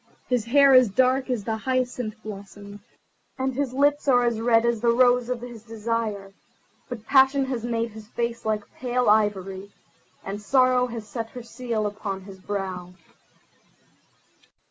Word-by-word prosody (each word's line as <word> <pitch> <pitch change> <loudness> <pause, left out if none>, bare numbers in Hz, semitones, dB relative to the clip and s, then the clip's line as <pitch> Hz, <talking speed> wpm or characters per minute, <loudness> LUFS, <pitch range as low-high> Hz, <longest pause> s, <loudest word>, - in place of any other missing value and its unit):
His 245 -3 0
hair 275 +3 +5
is 255 -3 +7
dark 260 +5 +2
as 240 -5 -1
the 220 +2 -2
hyacinth 250 -2 -2
blossom, 205 0 -9 0.6
and 265 0 -1
his 275 0 -2
lips 285 +2 +1
are 245 -2 +4
red 225 0 +2
as 235 -2 0
the 235 - +3
rose 245 0 +3
of 250 -2 -2
his 240 -2 -9
desire; 220 -3 -3 0.6
but 230 -3 -7
passion 270 +1 +4
has 255 -4 -4
made 230 -1 -2
his 215 0 -11
face 235 0 -3
like 215 -1 -1
pale 250 0 -1
ivory, 200 -2 +1 0.5
and 200 +2 -5
sorrow 255 +2 +3
has 230 -3 -7
set 225 +1 -5
her 245 0 -9
seal 230 -2 -3
upon 205 -2 -4
his 190 0 -12
brow." 185 -2 -5
230 Hz, 150 wpm, -25 LUFS, 210-250 Hz, 0.6 s, is